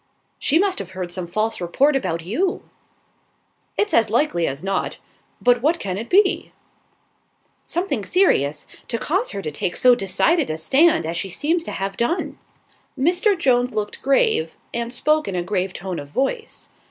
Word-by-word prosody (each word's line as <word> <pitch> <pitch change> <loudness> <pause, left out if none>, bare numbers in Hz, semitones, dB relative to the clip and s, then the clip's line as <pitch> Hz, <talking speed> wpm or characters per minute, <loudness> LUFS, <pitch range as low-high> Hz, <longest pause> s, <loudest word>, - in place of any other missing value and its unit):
"She 310 - +2
must 380 +1 +1
have 185 -1 -7
heard 180 -2 -4
some 180 -1 -4
false 215 +4 -1
report 275 - +2
about 170 -10 -1
you." 355 - -1 1.1
"It's 415 0 +1
as 225 -1 +4
likely 220 - +1
as 135 +4 -4
not; 195 0 -2 0.4
but 245 -1 +3
what 315 +6 +2
can 185 -2 -3
it 220 +4 -5
be?" 390 +1 +3 1.2
"Something 320 - -1
serious, 150 - +2 0.2
to 230 - -2
cause 375 - -1
her 200 - -5
to 155 - -3
take 175 +4 -2
so 250 -1 +6
decided 245 - +1
a 155 - -2
stand 275 - +3
as 165 +1 -3
she 195 +2 -2
seems 325 - -1
to - - -5
have 195 0 -4
done." 320 +10 -1 0.6
Mr. 360 +8 +2
Jones 250 -5 +2
looked 210 -1 -3
grave, 445 - +2 0.2
and 235 0 -2
spoke 305 +5 +1
in 195 - -3
a 175 - -1
grave 185 0 -1
tone 185 -1 -5
of 145 - -8
voice. 275 - -3
235 Hz, 170 wpm, -22 LUFS, -, 1.2 s, so